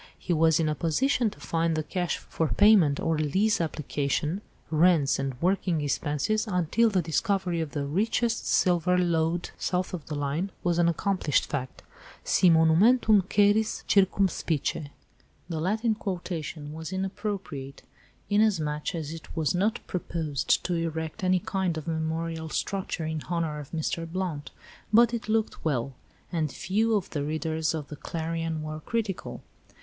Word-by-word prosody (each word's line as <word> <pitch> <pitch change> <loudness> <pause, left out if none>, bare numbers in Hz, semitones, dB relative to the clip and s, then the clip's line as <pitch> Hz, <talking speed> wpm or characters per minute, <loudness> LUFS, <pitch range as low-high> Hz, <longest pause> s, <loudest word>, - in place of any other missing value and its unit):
He 180 - -2
was 160 0 +4
in 160 - +2
a 155 - +1
position 225 - +1
to 210 - -15
find 165 0 0
the 155 - -1
cash 175 +1 -2
for 160 - -2
payment 195 -9 +5
of 160 -1 0
lease 190 +8 +2
application, 150 +2 -1 0.3
rents, 160 -4 +4
and 135 -2 -3
working 180 -2 +1
expenses 150 - 0
until 185 +4 +2
the 190 -4 +1
discovery 175 +1 0
of 155 -3 -5
the 145 -2 -2
richest 220 +8 0
silver 180 0 +3
lode 170 -1 0
south 180 0 -1
of 165 -5 -6
the 150 - -4
line 145 +7 -2
was 175 -1 +1
an 170 0 +4
accomplished 170 -3 +1
fact. 130 -3 -5 0.4
'Si 180 - +4
monumentum 190 +5 +5
queris, 210 +2 +3
circumspice.'" 185 -6 +1 0.6
The 165 -3 -3
Latin 220 +6 +1
quotation 170 -7 -5
was 160 +2 -6
inappropriate, 190 -7 -4 0.4
inasmuch 180 -7 +1
as 160 -1 -4
it 165 - -9
was 155 -4 +1
not 205 +6 0
proposed 165 -5 -1
to 180 - -1
erect 160 0 -3
any 185 0 +3
kind 190 -4 -1
of 155 - -5
memorial 160 0 -2
structure 190 -2 -2
in 160 -1 -3
honour 165 -3 -1
of 145 - -9
Mr. 165 +1 -3
Blount, 175 -5 -3 0.4
but 235 +2 +6
it 230 -2 -4
looked 220 0 0
well, 135 -4 -1 0.4
and 155 -4 -1
few 215 - +1
of 200 -4 -2
the 145 - -2
readers 155 +1 -1
of 150 -2 -6
the 150 - -6
Clarion 165 0 -3
were 155 0 -5
critical. 215 +2 -3
165 Hz, 150 wpm, -27 LUFS, 155-195 Hz, 0.6 s, but